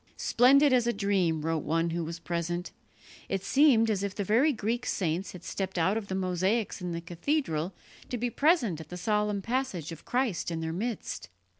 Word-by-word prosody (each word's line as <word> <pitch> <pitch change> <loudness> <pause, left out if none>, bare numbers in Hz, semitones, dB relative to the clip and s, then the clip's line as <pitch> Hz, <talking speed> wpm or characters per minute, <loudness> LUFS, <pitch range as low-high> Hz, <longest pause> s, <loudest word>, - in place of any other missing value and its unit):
"Splendid 275 +3 +5
as 245 -2 +3
a 240 - +2
dream," 185 -6 +1
wrote 165 -2 0
one 165 +2 0
who 170 0 -2
was 165 +1 -5
present, 175 +1 -3 0.6
"it 195 -1 -1
seemed 270 -6 +5
as 200 -3 0
if 200 -1 -3
the 205 - -1
very 235 - +3
Greek 235 0 -2
saints 180 +1 -1
had 180 - -10
stepped 190 -1 -4
out 185 +5 +2
of 220 -3 -3
the 190 - -3
mosaics 190 +4 0
in 180 -1 -3
the 170 0 -3
cathedral 175 - -1 0.3
to 245 - -2
be 240 +1 -1
present 255 - +2
at - - -12
the 180 - -6
solemn 210 +1 0
passage 230 - -2
of 165 - -9
Christ 245 -10 -1
in 165 -1 -3
their 160 0 -3
midst." 205 - -4
195 Hz, 195 wpm, -29 LUFS, 170-235 Hz, 0.6 s, Splendid